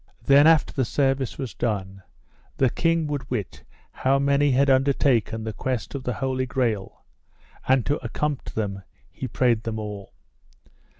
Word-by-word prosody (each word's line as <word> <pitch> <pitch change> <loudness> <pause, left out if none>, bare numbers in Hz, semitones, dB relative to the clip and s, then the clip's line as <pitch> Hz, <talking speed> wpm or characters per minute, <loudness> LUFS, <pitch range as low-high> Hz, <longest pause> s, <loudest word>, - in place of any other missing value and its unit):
Then 140 +2 +6
after 160 -2 +4
the 130 - 0
service 135 +1 0
was 130 -7 -5
done 95 -4 -3 0.6
the 130 -3 +3
king 165 -1 +1
would 145 -3 -4
wit 110 -7 -4 0.3
how 135 +1 +1
many 140 +1 +2
had 135 +2 +3
undertaken 130 -4 +2
the 110 -1 -4
quest 125 +1 -3
of 140 -2 -6
the 125 - -1
Holy 130 +1 -2
Grail; 115 -6 -2 0.6
and 130 -2 +3
to 145 -1 -1
accompt 145 +4 -3
them 100 -3 -3 0.3
he 130 - -6
prayed 120 -1 +1
them 110 -1 -4
all. 105 -2 -7
130 Hz, 155 wpm, -24 LUFS, 110-140 Hz, 0.6 s, Then